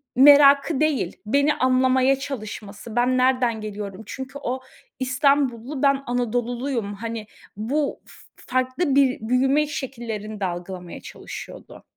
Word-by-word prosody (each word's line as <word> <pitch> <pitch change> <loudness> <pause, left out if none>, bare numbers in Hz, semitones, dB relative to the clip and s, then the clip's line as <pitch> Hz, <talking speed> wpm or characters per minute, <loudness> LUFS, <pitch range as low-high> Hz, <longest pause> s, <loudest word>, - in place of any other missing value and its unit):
merakı 280 +1 +7
değil, 305 -3 0
beni 280 +6 +2
anlamaya 260 +1 +3
çalışması. 215 -4 -7
Ben 250 +1 +2
nereden 250 -3 +2
geliyorum? 205 -1 -6
Çünkü 265 +5 -7
o, 255 +2 -2 0.4
İstanbullu, 260 0 +1
ben 275 0 +3
Anadoluluyum. 245 -1 -2
Hani, 225 0 -6 0.3
bu 280 +7 -2
f - - -16 0.2
farklı 255 +4 -1
bir 270 -2 +3
büyüme 270 +4 +3
şekillerini 230 -7 -5
de 195 - -1
algılamaya 175 0 -6
çalışıyordu. - - -10
255 Hz, 115 wpm, -23 LUFS, 220-275 Hz, 0.4 s, merakı